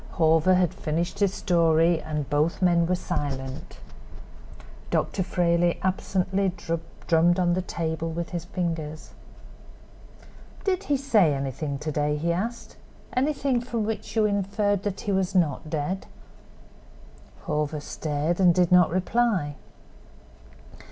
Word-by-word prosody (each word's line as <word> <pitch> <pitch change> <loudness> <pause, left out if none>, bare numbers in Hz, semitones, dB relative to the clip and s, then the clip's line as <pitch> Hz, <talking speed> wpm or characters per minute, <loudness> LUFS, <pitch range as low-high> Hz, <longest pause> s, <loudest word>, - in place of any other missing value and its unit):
Hawver 160 +2 +4
had 180 -2 +2
finished 170 +5 -3
his 200 -2 +3
story 165 -3 +2
and 150 -3 -3
both 150 +3 +1
men 170 -2 +3
were 180 - +2
silent. 140 -7 -4 1.1
Dr. 195 - 0
Frayley 175 -1 +1
absently 190 +1 0 0.5
drummed 170 +1 +4
on 175 -1 +2
the 185 - 0
table 165 -2 -3
with 165 +1 -4
his 175 -2 -4
fingers. 165 -4 -4 1.5
"Did 385 0 0
he 285 - +1
say 215 - +3
anything 140 +1 -3
to 155 +3 -4
day?" 150 0 0
he 170 +3 0
asked—"anything 250 - -2
from 235 -2 -2
which 220 +1 -4
you 220 -1 +3
inferred 205 0 0
that 200 -1 -3
he 205 - -2
was 190 0 0
not 155 -3 +1
dead?" 160 +5 -3 1.4
Hawver 150 0 -1
stared 150 +3 -2
and 180 -3 +5
did 180 -1 +3
not 180 -1 +6
reply. 185 -4 0
175 Hz, 125 wpm, -26 LUFS, 155-195 Hz, 1.5 s, not